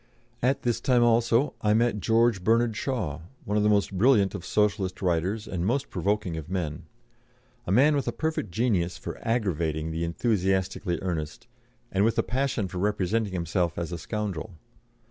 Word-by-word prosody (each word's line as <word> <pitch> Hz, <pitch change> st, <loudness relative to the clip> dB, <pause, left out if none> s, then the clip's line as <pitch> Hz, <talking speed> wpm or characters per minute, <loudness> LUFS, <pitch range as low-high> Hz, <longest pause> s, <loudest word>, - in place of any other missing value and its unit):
At 130 Hz, +3 st, +1 dB
this 120 Hz, -2 st, 0 dB
time 125 Hz, -3 st, +3 dB
also 120 Hz, +3 st, +3 dB
I 105 Hz, 0 st, +3 dB
met 115 Hz, -2 st, +2 dB
George 115 Hz, 0 st, +2 dB
Bernard 115 Hz, +1 st, +2 dB
Shaw, 105 Hz, -, -2 dB, 0.3 s
one 105 Hz, -, -1 dB
of 105 Hz, -, +3 dB
the 105 Hz, -, +3 dB
most 100 Hz, -1 st, +2 dB
brilliant 105 Hz, -1 st, +4 dB
of 100 Hz, -4 st, -6 dB
Socialist 100 Hz, -2 st, 0 dB
writers 95 Hz, +5 st, -1 dB
and 90 Hz, -4 st, -3 dB
most 130 Hz, +8 st, -1 dB
provoking 95 Hz, -1 st, -1 dB
of 80 Hz, 0 st, -7 dB
men; 85 Hz, -6 st, -3 dB, 0.8 s
a -, -, -1 dB
man 145 Hz, +9 st, +5 dB
with 140 Hz, -3 st, -1 dB
a -, -, +1 dB
perfect 160 Hz, -, -2 dB
genius 90 Hz, -3 st, 0 dB
for -, -, -7 dB
"aggravating" 85 Hz, -9 st, -1 dB
the 80 Hz, +1 st, -2 dB
enthusiastically 95 Hz, -1 st, 0 dB
earnest, 80 Hz, -5 st, -4 dB, 0.5 s
and 95 Hz, +1 st, +2 dB
with 115 Hz, +1 st, +2 dB
a -, -, +3 dB
passion 125 Hz, -5 st, -1 dB
for 90 Hz, 0 st, -6 dB
representing 105 Hz, +1 st, 0 dB
himself 85 Hz, 0 st, -1 dB
as 85 Hz, 0 st, -3 dB
a 85 Hz, -, -4 dB
scoundrel. 100 Hz, -1 st, -4 dB
100 Hz, 170 wpm, -27 LUFS, 90-115 Hz, 0.8 s, man